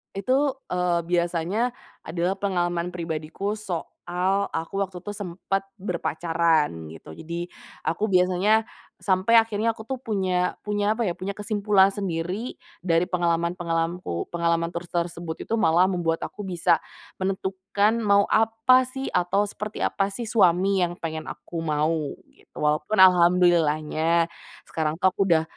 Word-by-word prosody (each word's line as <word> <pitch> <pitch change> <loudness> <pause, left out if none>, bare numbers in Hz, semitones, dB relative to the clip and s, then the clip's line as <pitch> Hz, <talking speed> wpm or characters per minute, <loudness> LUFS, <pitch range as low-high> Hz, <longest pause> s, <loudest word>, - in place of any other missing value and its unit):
Itu, 265 +7 +1
eee, 180 -1 +1
biasanya 175 +7 0 0.3
adalah 175 +4 -1
pengalaman 175 -3 -1
pribadiku 165 +4 -3
soal 185 0 -2
aku, 165 +5 -2
waktu 185 -2 -7
itu 205 - -6
sempet 195 0 -3 0.2
berpacaran 165 - 0
gitu. 80 0 -11
Jadi, 170 +2 -5 0.3
aku 210 +5 -1
biasanya 185 +5 +3 0.3
sampai 195 +4 +4
akhirnya 225 0 0
aku, 220 0 -11
tuh, 265 - -2
punya 185 -5 0
punya 205 0 +1
apa, 225 -1 -1
ya, 175 - -2
punya 190 +2 -4
kesimpulan 205 -1 +2
sendiri 190 +4 -3 0.2
dari 170 0 +2
pengalaman-pengalamanku, 170 - -1
pengalaman 170 -1 0
tur 170 - -3
tersebut 170 -1 -4
itu 225 - 0
malah 180 -4 +4
membuat 170 -3 0
aku 210 - -9
bisa 175 -2 +1 0.3
menentukan 195 +3 0
mau 200 -1 +4
apa, 225 +4 +4
sih, 265 +1 -5
atau 195 +4 +2
seperti 210 +1 -6
apa, 195 0 0
sih, 230 +4 -5
suami 190 -2 +3
yang 175 0 -3
pengen 160 -1 -4
aku 165 -1 -7
mau 155 -1 0 0.2
gitu. - - -21
Walaupun 150 +7 +1
alhamdulillahnya 170 -3 +4 0.4
sekarang, 160 0 -2
tuh, 190 - +4
aku 190 +1 +1
udah 165 -4 +3
180 Hz, 135 wpm, -25 LUFS, 170-200 Hz, 0.4 s, sampai